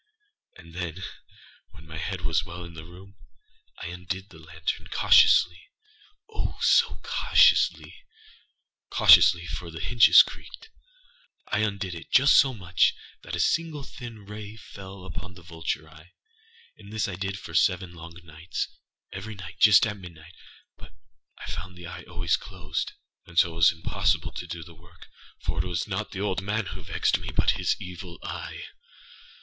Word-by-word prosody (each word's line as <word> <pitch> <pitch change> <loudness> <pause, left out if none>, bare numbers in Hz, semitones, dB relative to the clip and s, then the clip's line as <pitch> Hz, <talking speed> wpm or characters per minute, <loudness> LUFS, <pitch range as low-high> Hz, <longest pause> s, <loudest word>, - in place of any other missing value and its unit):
And 85 -2 -15
then, 90 +1 -5 0.7
when 80 - -16
my 80 0 -8
head 95 +2 -4
was 85 -1 0
well 85 0 -8
in 85 -1 -10
the 80 -1 -10
room, 95 +3 -15 0.6
I 85 - -6
undid 90 +3 -6
the 80 - -15
lantern 80 +1 -5
cautiouslyâoh, 425 - +1
so - - +3
cautiouslyâcautiously 445 -2 +3
(for - - -6
the - - -8
hinges - - +7
creaked)âI - - -7
undid 100 -3 -4
it 85 - -10
just 140 +2 +6
so 135 - +6
much 90 -8 +1 0.3
that - - -6
a - - -5
single 160 -4 0
thin 115 -5 -10
ray 105 +1 -8
fell 95 -3 -11
upon 95 -1 -8
the 85 - -14
vulture 80 -2 -4
eye. 80 +3 -17 0.7
And 100 0 -13
this 110 0 -1
I 100 - -5
did 95 +1 -4
for 80 - -10
seven 90 +2 +1
long 85 0 -10
nightsâevery 90 +5 -8
night 90 -2 -10
just 110 +2 +7
at 105 -2 -4
midnightâbut 85 -2 -15 0.4
I - - -9
found 90 +3 -7
the 90 - -10
eye 85 - -9
always 85 -1 0
closed; 85 -6 -5 0.3
and 85 - -14
so 85 - +5
it - - -10
was 85 -1 +6
impossible 80 -1 -1
to - - -7
do 85 -1 -6
the 85 - -14
work; 85 +1 -18 0.3
for - - -1
it - - -5
was 85 -3 -2
not - - -3
the 95 - -6
old 95 -2 -1
man 105 +2 -1
who - - -8
vexed - - +1
me, - - -7
but - - +2
his - - 0
Evil 90 -1 -9
Eye. - - -6
90 Hz, 155 wpm, -26 LUFS, 85-105 Hz, 0.7 s, hinges